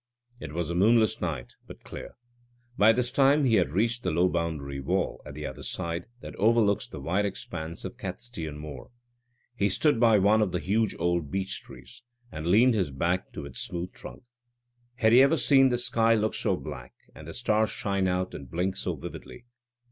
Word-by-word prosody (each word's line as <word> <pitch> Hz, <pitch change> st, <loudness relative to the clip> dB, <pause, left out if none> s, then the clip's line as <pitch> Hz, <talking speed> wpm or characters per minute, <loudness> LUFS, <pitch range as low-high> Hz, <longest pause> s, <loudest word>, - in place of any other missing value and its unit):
It -, -, -7 dB
was 85 Hz, 0 st, -2 dB
a -, -, -1 dB
moonless 110 Hz, +4 st, +3 dB
night, 75 Hz, -9 st, -4 dB
but -, -, -12 dB
clear. -, -, -9 dB, 0.6 s
By 110 Hz, 0 st, +6 dB
this 120 Hz, +1 st, 0 dB
time 140 Hz, +1 st, +4 dB
he 120 Hz, -, +2 dB
had -, -, +2 dB
reached 115 Hz, +9 st, 0 dB
the -, -, -1 dB
low 90 Hz, +3 st, +2 dB
boundary 80 Hz, -5 st, -3 dB
wall, 65 Hz, -, -1 dB
at 70 Hz, -, -9 dB
the 75 Hz, 0 st, -6 dB
other 65 Hz, -, -7 dB
side, 85 Hz, -1 st, -4 dB
that -, -, -8 dB
overlooks 110 Hz, -1 st, +3 dB
the -, -, -9 dB
wide 95 Hz, +5 st, 0 dB
expanse 85 Hz, -4 st, -6 dB
of -, -, -7 dB
Catstean 80 Hz, -11 st, -6 dB
Moor. 75 Hz, -3 st, -9 dB, 0.7 s
He 100 Hz, -3 st, +1 dB
stood 145 Hz, +6 st, +2 dB
by 115 Hz, -2 st, +5 dB
one 105 Hz, +3 st, +4 dB
of 100 Hz, -4 st, 0 dB
the 90 Hz, -, 0 dB
huge 110 Hz, +4 st, 0 dB
old 85 Hz, -3 st, 0 dB
beech 95 Hz, +4 st, -3 dB
trees, -, -, -14 dB, 0.3 s
and 80 Hz, +1 st, -5 dB
leaned 115 Hz, +8 st, +5 dB
his 95 Hz, -8 st, 0 dB
back 85 Hz, +7 st, -1 dB
to 75 Hz, -, -6 dB
its 65 Hz, -3 st, -8 dB
smooth 90 Hz, +4 st, -4 dB
trunk. 130 Hz, 0 st, -11 dB, 0.7 s
Had 110 Hz, -2 st, +3 dB
he 125 Hz, +3 st, +8 dB
ever 140 Hz, +4 st, +4 dB
seen 135 Hz, -3 st, +5 dB
the 120 Hz, -, +1 dB
sky 115 Hz, -1 st, +3 dB
look 110 Hz, 0 st, 0 dB
so -, -, 0 dB
black, 60 Hz, 0 st, -9 dB, 0.2 s
and 80 Hz, -, -12 dB
the 80 Hz, -, -7 dB
stars 110 Hz, -2 st, +1 dB
shine 100 Hz, -2 st, -1 dB
out 90 Hz, 0 st, -1 dB
and 70 Hz, -3 st, -9 dB
blink 90 Hz, +5 st, -2 dB
so -, -, -2 dB
vividly? 120 Hz, -, -10 dB
95 Hz, 195 wpm, -27 LUFS, 85-115 Hz, 0.7 s, he